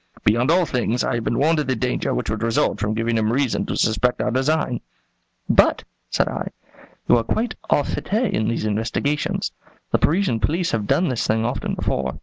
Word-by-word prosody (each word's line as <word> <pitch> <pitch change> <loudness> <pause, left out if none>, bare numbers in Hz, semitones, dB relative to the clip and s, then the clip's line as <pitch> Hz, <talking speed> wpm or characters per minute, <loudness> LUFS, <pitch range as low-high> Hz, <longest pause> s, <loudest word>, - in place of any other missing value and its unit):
Beyond 120 +5 +3
all 175 +1 +4
things, 125 -3 0
I - - 0
have 120 -1 -1
been 115 - -1
warned 155 +3 +3
of 150 - -1
the 130 - +1
danger 110 - -1
which - - -2
would 105 0 -3
result 115 -2 +1
from 105 +2 -1
giving 115 0 0
him 110 0 +1
reason 130 -1 0
to - - -2
suspect 110 +3 +1
our - - 0
design." 130 -1 0 0.7
"But," - - +4 0.3
said - - +1
I, - - -3 0.6
"you - - +6
are 115 - +1
quite 220 - -1 0.2
au 145 - +3
fait - - -5
in 205 - +1
these 115 -1 -1
investigations. 115 +7 -1 0.4
The - - +3
Parisian 170 - +2
police 165 - 0
have 105 -3 -1
done 180 - +2
this 125 -3 -1
thing 110 +1 +1
often 120 +3 -2
before." 65 -1 -2
120 Hz, 200 wpm, -22 LUFS, 110-150 Hz, 0.7 s, you